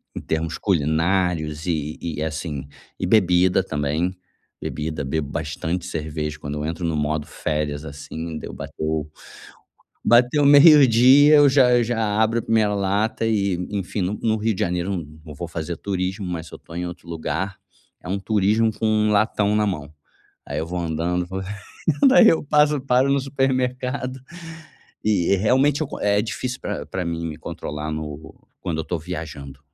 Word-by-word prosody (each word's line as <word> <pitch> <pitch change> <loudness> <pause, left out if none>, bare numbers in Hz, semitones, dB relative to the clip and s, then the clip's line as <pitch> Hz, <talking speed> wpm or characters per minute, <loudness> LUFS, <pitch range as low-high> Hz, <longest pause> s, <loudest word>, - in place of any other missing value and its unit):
em - - -4
termos 80 0 -2
culinários 80 -2 0
e 75 -3 -2
e, 80 -2 -3
assim, 80 -3 -4 0.3
e - - -1
bebida 90 -2 +4
também, 80 +3 -1 0.5
bebida, 75 -1 -4
bebo 70 +1 -2
bastante 80 +3 -3
cerveja 75 -3 -4
quando 75 +1 -5
eu - - -2
entro 80 +2 -3
no 80 -2 -1
modo 75 0 -1
férias, 75 -1 -3
assim. 80 +2 -6
Deu - - -8
bateu 80 -1 -4 1.0
bateu 125 +5 +4
meio-dia, 145 -1 +7
eu 145 -1 +7
já 130 -2 +5
eu 120 -1 +4
já 115 0 -2 0.2
abro 115 +1 +1
a - - -8
1ª 110 -2 +2
lata 100 +3 0
e, 100 -4 +1 0.2
enfim, 100 0 -3
no 95 +4 -2
no 110 -1 +2
Rio 110 +1 0
de - - -7
Janeiro 90 +2 -1
eu 95 - -1 0.3
não 75 - -9
vou 85 +3 -6
fazer 85 +1 -4
turismo, 95 0 -3
mas 85 -2 -4
se - - -11
eu - - -10
tô 80 - -14
em 90 +1 -3
outro 90 0 -9
lugar, 85 +3 -3 0.5
é - - -9
um 95 +2 -1
turismo 110 +2 +2
com 110 - -2
1 110 -1 +2
latão 105 0 +2
na 105 - +2
mão. 75 -7 -4 0.5
Aí - - -4
eu 80 - -2
vou 90 +2 -4
andando, 85 +2 -1
vou 95 +1 -5 0.7
daí 255 -3 +7
eu 165 - +1
passo, 150 0 +3
paro 130 +1 +2
no 140 - +3
supermercado 130 -1 -1 0.8
e 100 -3 +2
realmente 130 +9 +2
é - - -3
o - - -8
é 105 0 +3
difícil 125 +3 -4
pra 75 - -4
pra 90 +4 -4
mim 85 0 -3
me 80 - -6
controlar 75 +2 -6
no 75 0 -6 0.3
quando 85 -4 -3
eu - - -2
tô 85 - -3
viajando, 75 -5 -7
90 Hz, 175 wpm, -22 LUFS, 80-110 Hz, 1.0 s, meio-dia